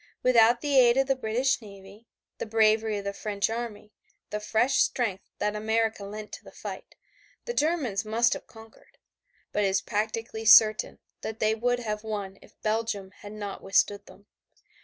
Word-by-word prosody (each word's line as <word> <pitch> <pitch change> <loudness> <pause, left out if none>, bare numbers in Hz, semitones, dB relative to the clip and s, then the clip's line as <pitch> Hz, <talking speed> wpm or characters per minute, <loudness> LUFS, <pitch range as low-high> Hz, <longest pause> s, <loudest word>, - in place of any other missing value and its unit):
Without 235 -1 +5
the 285 -3 +3
aid 240 0 +5
of 270 - +3
the 270 0 +1
British 250 +2 0
navy, 200 +1 -14 0.3
the - - -4
bravery 220 0 +2
of 200 - -5
the 200 0 -3
French 205 +1 -2
army, 225 -2 -6 0.4
the 210 - -2
fresh 225 +5 +1
strength 205 -6 0
that 210 0 -1
America 220 0 0
lent 210 +1 -8
to - - -9
the - - -13
fight, - - -9 0.5
the 475 - -3
Germans 290 - 0
must 225 +3 +2
have - - -8
conquered. 225 -1 -17 0.5
But 210 - 0
it - - +3
is 190 0 +2
practically 220 +1 -3
certain 215 0 +6 0.2
that 220 - -5
they 215 0 +2
would 245 +2 0
have 210 -2 -4
won 205 -3 -5
if - - -20
Belgium 215 -3 -2
had 205 0 -9
not 205 -2 -6
withstood 200 +1 +1
them. 200 - -17
220 Hz, 175 wpm, -27 LUFS, 210-235 Hz, 0.5 s, certain